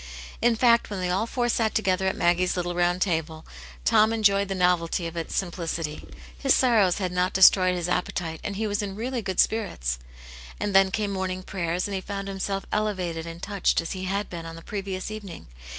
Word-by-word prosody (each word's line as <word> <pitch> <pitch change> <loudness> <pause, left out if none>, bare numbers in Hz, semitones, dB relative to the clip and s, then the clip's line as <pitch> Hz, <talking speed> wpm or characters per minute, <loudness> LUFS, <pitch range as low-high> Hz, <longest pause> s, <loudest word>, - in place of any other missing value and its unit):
In 235 0 +4
fact, 235 0 +4
when 200 -2 -4
they 180 -1 -1
all 195 +5 0
four 240 0 -1
sat 225 -2 0
together 190 -2 +1
at 190 - 0
Maggie's 175 +1 +2
little 175 0 -1
round 175 +1 +2
table, 160 -3 -2 0.4
Tom 215 - +5
enjoyed 200 -3 +3
the 195 - -3
novelty 180 -1 +1
of 165 0 -5
its 165 -1 -4
simplicity; 165 -4 -3 0.3
his 275 - +3
sorrows 220 -8 +3
had 185 -3 -2
not 180 +1 0
destroyed 185 -1 +6
his 175 -1 -2
appe 180 0 0
tite, 160 -3 -4
and 205 - -4
he 220 +3 -2
was 205 0 -1
in 195 -2 -4
really 240 +3 -3
good 190 -3 -3
spirits. 115 - 0 0.6
And 205 - -2
then 195 0 +6
came 205 +1 -2
morning 185 -1 -3
prayers, 180 -1 -2
and 200 - -5
he 190 - -2
found 195 0 -5
himself 195 0 -3
elevated 180 -6 -2
and 165 +1 -9
touched 200 -3 +1
as 165 - -4
he 185 -1 -4
had 200 +2 -1
been 165 -2 -7
on 165 - -8
the 165 - -11
previous 195 -1 -4
evening. 205 -6 -8
190 Hz, 210 wpm, -26 LUFS, 175-205 Hz, 0.6 s, destroyed